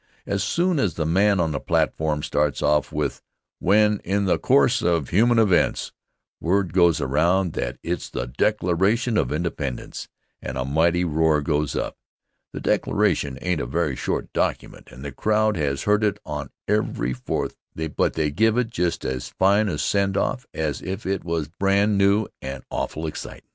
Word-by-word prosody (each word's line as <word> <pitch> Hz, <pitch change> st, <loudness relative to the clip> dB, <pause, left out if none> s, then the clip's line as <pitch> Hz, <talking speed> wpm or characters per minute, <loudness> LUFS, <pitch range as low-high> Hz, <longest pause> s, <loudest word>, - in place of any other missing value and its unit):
As 100 Hz, 0 st, -1 dB
soon 170 Hz, -, +1 dB
as 100 Hz, -8 st, 0 dB
the 80 Hz, -, -1 dB
man 100 Hz, +4 st, +3 dB
on 80 Hz, -2 st, +1 dB
the -, -, -2 dB
platform 75 Hz, -1 st, 0 dB
starts 75 Hz, -1 st, 0 dB
off 75 Hz, -3 st, +2 dB
with 75 Hz, -3 st, -2 dB, 0.4 s
"when, 105 Hz, +1 st, +3 dB
in 100 Hz, +2 st, 0 dB
the 95 Hz, -, +2 dB
course 70 Hz, -1 st, +3 dB
of 85 Hz, -5 st, +1 dB
human 115 Hz, +6 st, +3 dB
events," 100 Hz, -6 st, +2 dB, 0.5 s
word 95 Hz, 0 st, 0 dB
goes 85 Hz, -4 st, +4 dB
around 85 Hz, +6 st, +1 dB
that -, -, -3 dB
it's 85 Hz, +1 st, -3 dB
the -, -, -3 dB
Declaration 105 Hz, -, +1 dB
of 70 Hz, -, +1 dB
Independence, 75 Hz, -5 st, -4 dB, 0.3 s
and -, -, -5 dB
a 65 Hz, -, -1 dB
mighty 85 Hz, +5 st, +2 dB
roar 80 Hz, -1 st, +2 dB
goes 75 Hz, -1 st, -1 dB
up. -, -, -3 dB, 0.5 s
The -, -, -6 dB
Declaration 70 Hz, -2 st, +1 dB
ain't 90 Hz, -3 st, 0 dB
a -, -, -3 dB
very 75 Hz, 0 st, -1 dB
short 60 Hz, -, -3 dB
document -, -, -2 dB
and 65 Hz, +3 st, -11 dB
the 70 Hz, -, -4 dB
crowd 110 Hz, -, +1 dB
has 70 Hz, -3 st, -1 dB
heard 105 Hz, +1 st, +2 dB
it 105 Hz, -1 st, +1 dB
on 75 Hz, -1 st, -5 dB, 0.2 s
every 100 Hz, -, 0 dB
Fourth 60 Hz, -, -3 dB, 0.4 s
but -, -, +1 dB
they 75 Hz, -2 st, 0 dB
give 110 Hz, +9 st, +2 dB
it 120 Hz, -2 st, 0 dB
just 90 Hz, -4 st, -1 dB
as 65 Hz, -1 st, -3 dB
fine 100 Hz, +2 st, +3 dB
a 75 Hz, -, -2 dB
send 100 Hz, +4 st, +1 dB
off 125 Hz, +5 st, -1 dB
as 75 Hz, -5 st, -2 dB
if 95 Hz, +3 st, -5 dB
it 95 Hz, 0 st, -1 dB
was 85 Hz, -3 st, -2 dB
brand 100 Hz, +4 st, +1 dB
new 100 Hz, +2 st, +3 dB, 0.2 s
and 65 Hz, -1 st, -6 dB
awful 80 Hz, -, -3 dB
excitin'. 80 Hz, -, -6 dB
85 Hz, 175 wpm, -23 LUFS, 75-100 Hz, 0.5 s, goes